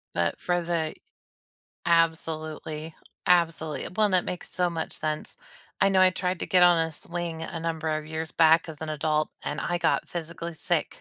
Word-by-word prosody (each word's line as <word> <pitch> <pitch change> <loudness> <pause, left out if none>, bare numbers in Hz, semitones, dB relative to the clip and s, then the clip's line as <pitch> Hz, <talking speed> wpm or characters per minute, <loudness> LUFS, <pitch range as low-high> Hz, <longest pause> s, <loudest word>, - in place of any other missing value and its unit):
But, 85 0 +1
for 175 0 +1
the 165 -2 -1 0.9
absolutely, 160 -1 0 0.3
absolutely 165 -5 +2
well, 215 - +4
and 190 - 0
that 180 - +4
makes 180 - -5
so 180 -1 +1
much 165 -1 -4
sense. 155 0 -3 0.4
I 195 - +5
know 190 -1 +3
I 185 0 +7
tried 180 -1 -2
to - - -3
get 180 -1 +4
on 175 -1 +7
a 165 0 +1
swing 170 0 -4
a 165 0 -4
number 160 -1 -2
of 155 0 -1
years 160 0 -4
back 165 0 +5
as 155 -1 -8
an 160 - -4
adult, 155 0 0
and 145 - -3
I 175 - 0
got 165 - +1
physically 170 0 -5
sick. - - -1
165 Hz, 185 wpm, -27 LUFS, 155-175 Hz, 0.9 s, I